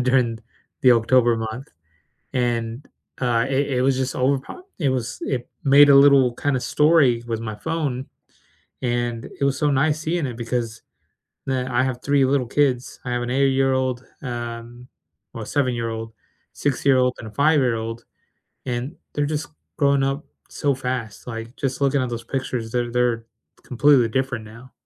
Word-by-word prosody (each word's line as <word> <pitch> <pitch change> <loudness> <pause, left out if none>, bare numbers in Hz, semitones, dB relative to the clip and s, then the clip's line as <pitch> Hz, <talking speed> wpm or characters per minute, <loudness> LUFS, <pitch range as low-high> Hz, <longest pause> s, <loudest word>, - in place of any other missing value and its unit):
and - - 0
during 125 -3 +2 0.4
the 125 -1 +7
October 120 0 +3
month, 115 +4 -5 0.7
and, 120 0 -1 0.3
uh, 120 -2 +1
it 140 +1 +1
it - - +2
was 135 0 +2
just 130 0 -1
overpop 135 - -1 0.2
it 145 -6 +1
was 125 -3 -2
it 125 -2 -3
made 145 +1 +7
a 140 - +8
little 140 -3 +6
kind 145 +1 0
of 125 - -1
story 145 -7 +3
with 115 -1 -2
my 110 -2 -5
phone, 135 +1 -3 0.8
and 120 -1 -1
it - - -1
was 140 -1 +1
so 150 -1 +2
nice 150 +3 +2
seeing 160 -2 -1
it 120 -2 -7
because, 115 -1 -3 0.7
uh, 130 -1 0
I 120 +1 +2
have 130 -2 -3
3 140 -1 +3
little 135 -2 +1
kids, 130 -2 0
I 125 - -4
have 120 - -1
an 120 - -3
8 130 -1 +1 0.2
um, 120 -1 -6 0.5
or - - -5
a - - -7
7 115 -4 -2 0.4
6 130 -2 +2
and 115 - -8
a - - -10
5 120 -5 +1 0.6
and 125 +5 -3 0.2
they're 145 0 0
just 150 -1 -3 0.3
growing 140 -1 +3
up 135 +2 -1 0.2
so 140 -2 0
fast, 125 -5 -4
like, 115 0 -6
just 135 0 -3
looking 140 0 +3
at 125 - -1
those 120 -1 -5
pictures, 125 -3 -3
they're 120 -1 -1
they're 120 -2 0 0.4
completely 130 -2 +4
different 130 -1 -2
now. 120 +4 -13
125 Hz, 165 wpm, -22 LUFS, 120-140 Hz, 0.8 s, a